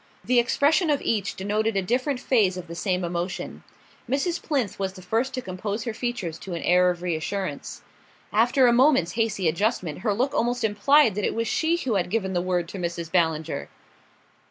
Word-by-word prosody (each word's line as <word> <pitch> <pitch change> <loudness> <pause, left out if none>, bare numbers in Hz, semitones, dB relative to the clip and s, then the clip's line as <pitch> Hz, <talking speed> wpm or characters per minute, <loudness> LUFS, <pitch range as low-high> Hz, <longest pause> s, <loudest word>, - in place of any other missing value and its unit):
The 245 +3 +4
expression 300 +7 +2
of 290 -2 +2
each 205 -3 -1
denoted 210 +2 -1
a 195 - +1
different 255 +6 0
phase 205 -9 +2
of 180 - -6
the 170 - -9
same 180 +1 -1
emotion. 175 +1 -4 0.5
Mrs. 330 +7 0
Plinth 260 - -2
was 190 -1 -2
the 185 - -12
first 225 +8 0
to 255 - -4
compose 200 +3 -4
her 230 -2 -3
features 215 -9 -4
to 185 -3 -6
an 170 - -5
air 180 +1 +4
of 175 0 -3
reassurance: 175 -1 -3 0.5
after 245 +5 +4
a 240 - +5
moment's 250 - +4
hasty 215 -3 0
adjustment 170 -2 -1
her 210 -3 0
look 255 +6 0
almost 240 +1 0
implied 225 +4 +4
that 210 +2 -3
it - - 0
was 230 0 -1
she 325 +8 +1
who 250 -11 -1
had 180 - -1
given 190 -2 -1
the 175 - +1
word 180 -1 -1
to 195 - -7
Mrs. 170 -2 -4
Ballinger. 160 -3 0
205 Hz, 195 wpm, -25 LUFS, 180-245 Hz, 0.5 s, a